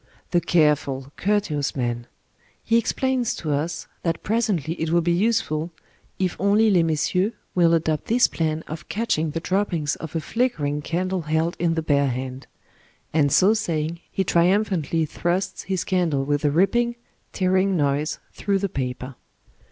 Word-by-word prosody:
The 175 Hz, -1 st, +3 dB
careful, 150 Hz, -5 st, +1 dB
courteous 195 Hz, -9 st, 0 dB
man! 120 Hz, -2 st, -2 dB, 0.6 s
He 230 Hz, +1 st, +3 dB
explains 255 Hz, +1 st, 0 dB
to 155 Hz, -, -3 dB
us 150 Hz, +4 st, -2 dB, 0.2 s
that 165 Hz, -2 st, -2 dB
presently 200 Hz, -, 0 dB
it 160 Hz, -, 0 dB
will 170 Hz, +1 st, +3 dB
be 170 Hz, +1 st, +1 dB
useful, 170 Hz, -5 st, +1 dB, 0.5 s
if 185 Hz, -2 st, 0 dB
only 210 Hz, +2 st, +4 dB
^^ -, -, +3 dB
les 175 Hz, -, +5 dB
messieurs 165 Hz, +6 st, +1 dB
" -, -, -43 dB
will 170 Hz, -2 st, +4 dB
adopt 155 Hz, -2 st, 0 dB
this 240 Hz, +2 st, +4 dB
plan 160 Hz, -1 st, -2 dB
of 155 Hz, +1 st, -8 dB
catching 195 Hz, -8 st, 0 dB
the 165 Hz, -, -3 dB
droppings 175 Hz, -5 st, 0 dB
of 160 Hz, 0 st, -8 dB
a -, -, +1 dB
flickering 155 Hz, -, -1 dB
candle 180 Hz, +4 st, -1 dB
held 160 Hz, +2 st, 0 dB
in 170 Hz, -1 st, +1 dB
the 160 Hz, -, -1 dB
bare 140 Hz, -2 st, +2 dB
hand; 130 Hz, +1 st, -5 dB, 0.7 s
and 145 Hz, -3 st, +3 dB
so 195 Hz, +9 st, +5 dB
saying 165 Hz, -6 st, -2 dB
he 195 Hz, -, 0 dB
triumphantly 175 Hz, -3 st, +2 dB
thrusts 180 Hz, +4 st, -2 dB
his 190 Hz, -2 st, 0 dB
candle 165 Hz, -8 st, 0 dB
with 145 Hz, +1 st, 0 dB
a 150 Hz, -, +3 dB
ripping, 235 Hz, +10 st, +2 dB, 0.4 s
tearing 185 Hz, 0 st, +2 dB
noise 145 Hz, +1 st, 0 dB, 0.2 s
through 200 Hz, -1 st, 0 dB
the 195 Hz, 0 st, -1 dB
paper. 130 Hz, -2 st, -4 dB
165 Hz, 160 wpm, -23 LUFS, 150-195 Hz, 0.7 s, les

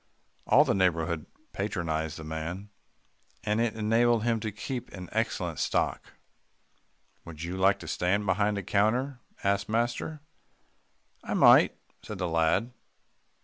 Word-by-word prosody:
All -, -, +6 dB
the -, -, +1 dB
neighbourhood 85 Hz, -4 st, 0 dB, 0.3 s
patronised 80 Hz, -6 st, -2 dB
the 80 Hz, -, -8 dB
man, 80 Hz, +6 st, -5 dB, 0.7 s
and 105 Hz, +2 st, +1 dB
it 115 Hz, -2 st, 0 dB
enabled 115 Hz, +1 st, +2 dB
him 115 Hz, -1 st, +1 dB
to 110 Hz, 0 st, -3 dB
keep 120 Hz, +4 st, -5 dB
an 90 Hz, -2 st, -8 dB
excellent 105 Hz, -7 st, -2 dB
stock. -, -, -1 dB, 1.1 s
"Would 80 Hz, -1 st, -9 dB
you 85 Hz, +2 st, -4 dB
like 95 Hz, +1 st, +3 dB
to 80 Hz, -, -9 dB
stand 90 Hz, +6 st, 0 dB
behind 105 Hz, +2 st, +1 dB
a 100 Hz, -, -3 dB
counter?" 120 Hz, +8 st, +1 dB, 0.2 s
asked 100 Hz, +1 st, 0 dB
master. 120 Hz, +7 st, -1 dB, 1.0 s
"I -, -, -3 dB
might," -, -, +6 dB, 0.2 s
said 105 Hz, -, -7 dB
the 90 Hz, -1 st, -2 dB
lad. 85 Hz, +8 st, +1 dB
100 Hz, 135 wpm, -28 LUFS, 85-110 Hz, 1.1 s, All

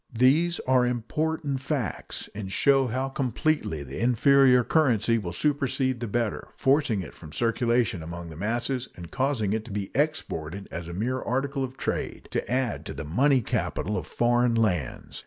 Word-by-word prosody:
These 155 Hz, +8 st, +4 dB
are 130 Hz, -1 st, +3 dB
important 140 Hz, +4 st, -1 dB
facts, 130 Hz, -, -3 dB
and 100 Hz, -2 st, -6 dB
show 135 Hz, +3 st, +4 dB
how 130 Hz, +3 st, -1 dB
completely 135 Hz, -, -1 dB
the 65 Hz, 0 st, -7 dB
inferior 125 Hz, +2 st, +5 dB
currency 115 Hz, -6 st, +2 dB
will 90 Hz, -5 st, -4 dB
supersede 130 Hz, -, 0 dB
the 120 Hz, -, -3 dB
better, 115 Hz, 0 st, -2 dB
forcing 135 Hz, -7 st, +2 dB
it -, -, -9 dB
from 80 Hz, -3 st, -12 dB
circulation 115 Hz, -, +1 dB
among 85 Hz, +1 st, -7 dB
the 80 Hz, -, -9 dB
masses 120 Hz, -, -1 dB
and 85 Hz, -1 st, -10 dB
causing 130 Hz, -7 st, 0 dB
it 110 Hz, 0 st, -1 dB
to 120 Hz, -, -9 dB
be 100 Hz, -1 st, -3 dB
exported 100 Hz, -, -2 dB
as 85 Hz, -1 st, -5 dB
a 85 Hz, -, -6 dB
mere 125 Hz, +7 st, -1 dB
article 135 Hz, +2 st, -1 dB
of 130 Hz, 0 st, -6 dB
trade, -, -, -3 dB
to -, -, -2 dB
add 125 Hz, -3 st, 0 dB
to -, -, -6 dB
the -, -, -5 dB
money 130 Hz, -, +3 dB
capital 105 Hz, -1 st, -2 dB
of 85 Hz, -5 st, -3 dB
foreign 120 Hz, 0 st, +2 dB
lands. 90 Hz, -, -1 dB
120 Hz, 170 wpm, -26 LUFS, 100-135 Hz, -, inferior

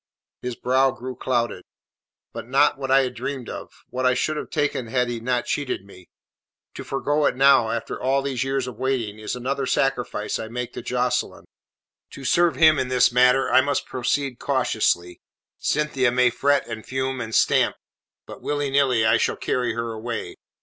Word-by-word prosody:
His 125 Hz, -1 st, -4 dB
brow 130 Hz, +3 st, +2 dB
grew 130 Hz, 0 st, -6 dB
clouded. 120 Hz, -7 st, -1 dB, 0.7 s
"But -, -, -7 dB
not 140 Hz, +3 st, +3 dB
what 135 Hz, -1 st, -4 dB
I 135 Hz, 0 st, +5 dB
had 125 Hz, -, -3 dB
dreamed 135 Hz, -4 st, -5 dB
of; -, -, -7 dB, 0.2 s
what 130 Hz, +1 st, -3 dB
I 125 Hz, -1 st, +3 dB
should 155 Hz, +5 st, 0 dB
have -, -, -5 dB
taken 145 Hz, -4 st, -1 dB
had 125 Hz, +1 st, 0 dB
he 120 Hz, -1 st, -3 dB
not 125 Hz, +1 st, -1 dB
cheated 140 Hz, -8 st, -2 dB
me. 90 Hz, -3 st, -16 dB, 0.6 s
To -, -, -7 dB
forgo 145 Hz, +2 st, 0 dB
it -, -, 0 dB
now 135 Hz, -4 st, +5 dB
after 115 Hz, 0 st, -4 dB
all 135 Hz, +1 st, +1 dB
these 135 Hz, -2 st, -1 dB
years 135 Hz, -1 st, -1 dB
of 125 Hz, -4 st, -8 dB
waiting 125 Hz, -5 st, -2 dB
is 110 Hz, -, -4 dB
another 135 Hz, +2 st, -2 dB
sacrifice 125 Hz, -5 st, -1 dB
I 110 Hz, -, -5 dB
make 125 Hz, +1 st, -5 dB
to -, -, -6 dB
Jocelyn. 125 Hz, 0 st, -1 dB, 0.7 s
To 135 Hz, -, -9 dB
serve 170 Hz, +4 st, +3 dB
him 155 Hz, -3 st, +5 dB
in 130 Hz, -, -1 dB
this 125 Hz, -1 st, +3 dB
matter 125 Hz, +2 st, +4 dB
I 130 Hz, +1 st, +6 dB
must 140 Hz, +2 st, -1 dB
proceed 130 Hz, +1 st, -2 dB
cautiously. 110 Hz, -10 st, 0 dB, 0.4 s
Cynthia 145 Hz, -4 st, +1 dB
may 125 Hz, 0 st, +3 dB
fret 140 Hz, +3 st, +1 dB
and 110 Hz, -2 st, -6 dB
fume 130 Hz, 0 st, -3 dB
and 110 Hz, -1 st, -4 dB
stamp, -, -, +3 dB, 0.5 s
but -, -, -11 dB
willy 145 Hz, -1 st, -2 dB
nilly 130 Hz, -5 st, +3 dB
I 110 Hz, +1 st, +4 dB
shall -, -, 0 dB
carry 125 Hz, -1 st, -1 dB
her 115 Hz, 0 st, -3 dB
away. 115 Hz, +1 st, -5 dB
125 Hz, 185 wpm, -23 LUFS, 120-135 Hz, 0.7 s, I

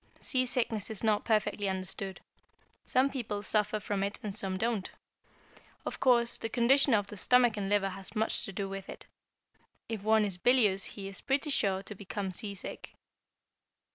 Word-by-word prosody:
Seasickness 245 Hz, -5 st, 0 dB
is 220 Hz, -1 st, -3 dB
not 215 Hz, -2 st, +2 dB
perfectly 210 Hz, -2 st, +1 dB
understood. 190 Hz, 0 st, -3 dB, 0.6 s
Some 265 Hz, +2 st, +2 dB
people 215 Hz, -6 st, -4 dB
suffer 210 Hz, +1 st, +1 dB
from 205 Hz, -1 st, -2 dB
it 200 Hz, +1 st, -2 dB
and 205 Hz, -2 st, -3 dB
some 195 Hz, -2 st, +1 dB
do 230 Hz, +5 st, +1 dB
not. 205 Hz, -5 st, -4 dB, 1.0 s
Of -, -, -4 dB
course, 235 Hz, -2 st, +3 dB
the 225 Hz, -, -3 dB
condition 255 Hz, +2 st, +4 dB
of 205 Hz, -1 st, +1 dB
the 205 Hz, -, -10 dB
stomach 245 Hz, +2 st, +4 dB
and 200 Hz, -2 st, -3 dB
liver 200 Hz, -1 st, +2 dB
has 195 Hz, +3 st, -2 dB
much 220 Hz, +1 st, 0 dB
to -, -, -5 dB
do 195 Hz, +1 st, -3 dB
with 195 Hz, 0 st, -7 dB
it. -, -, -9 dB, 0.8 s
If 225 Hz, -3 st, -4 dB
one 220 Hz, +1 st, +3 dB
is 190 Hz, -3 st, -4 dB
bilious 210 Hz, -5 st, +4 dB
he 195 Hz, -2 st, -5 dB
is 195 Hz, -1 st, -7 dB
pretty 280 Hz, +2 st, 0 dB
sure 195 Hz, -7 st, +1 dB
to 210 Hz, -, -7 dB
become 200 Hz, -1 st, -5 dB
seasick. 200 Hz, 0 st, -6 dB
210 Hz, 170 wpm, -30 LUFS, 195-235 Hz, 1.0 s, condition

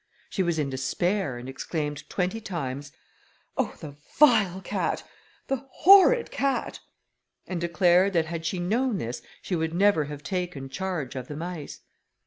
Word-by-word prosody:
She 195 Hz, -, 0 dB
was 170 Hz, -3 st, +1 dB
in 145 Hz, -3 st, -1 dB
despair, 145 Hz, +3 st, -1 dB
and 120 Hz, +1 st, -8 dB
exclaimed 145 Hz, +2 st, -4 dB
twenty 185 Hz, +4 st, -1 dB
times, 145 Hz, -8 st, -4 dB, 0.6 s
"Oh! -, -, -1 dB
the 145 Hz, -2 st, -9 dB, 0.2 s
vile 215 Hz, -, +5 dB
cat! -, -, -2 dB, 0.4 s
the 270 Hz, 0 st, -3 dB
horrid 400 Hz, +6 st, +6 dB
cat!" 275 Hz, -1 st, -1 dB, 0.7 s
and 180 Hz, -2 st, -4 dB
declared 180 Hz, +2 st, +3 dB
that 165 Hz, -2 st, +2 dB
had 165 Hz, 0 st, -5 dB
she 160 Hz, +4 st, -2 dB
known 220 Hz, +6 st, 0 dB
this, 120 Hz, -3 st, -4 dB, 0.2 s
she 185 Hz, -, -2 dB
would 160 Hz, 0 st, -1 dB
never 190 Hz, -5 st, +4 dB
have 145 Hz, 0 st, -8 dB
taken 175 Hz, -6 st, -3 dB
charge 160 Hz, -3 st, -3 dB
of 130 Hz, -1 st, -5 dB
the 150 Hz, -, -6 dB
mice. 165 Hz, -1 st, -6 dB
175 Hz, 150 wpm, -26 LUFS, 145-195 Hz, 0.7 s, horrid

